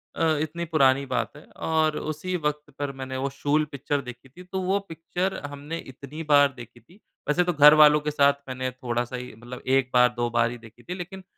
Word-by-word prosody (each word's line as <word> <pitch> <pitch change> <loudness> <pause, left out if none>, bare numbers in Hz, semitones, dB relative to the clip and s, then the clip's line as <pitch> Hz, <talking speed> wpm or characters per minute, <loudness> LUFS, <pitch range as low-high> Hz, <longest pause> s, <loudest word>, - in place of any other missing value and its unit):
अ, - - -1 0.2
इतनी 170 +2 -3
पुरानी 140 -4 +3
बात 135 - -2
है। - - -13
और 155 -1 +1
उसी 155 +4 -3
वक़्त 150 -1 -3
पर 145 -1 -2
मैंने 130 0 -4
वो 135 +1 -1
शूल 145 +3 +1
पिक्चर 140 +1 -2
देखी 125 +1 -11
थी, 180 +7 -13
तो 190 +1 -4
वो 190 +2 +1
पिक्चर 175 +3 -3
हमने 145 +3 -6
इतनी 140 +3 -9
बार 145 -1 +5
देखी 120 0 -11
थी। 180 - -22 0.3
वैसे 175 +4 +3
तो 175 0 0
घरवालों 150 0 +8
के 150 - -2
साथ 140 -1 +4
मैंने 130 0 -3
थोड़ा-सा 120 0 -3
ही 125 0 -7
मतलब 120 +2 -10
1 135 -1 +2
बार 125 0 +6
2 120 0 0
बार 120 0 +2
ही 120 - -7
देखी 115 +1 -16
थी 180 - -5
लेकिन 190 +1 -8
145 Hz, 210 wpm, -25 LUFS, 130-160 Hz, 0.3 s, घरवालों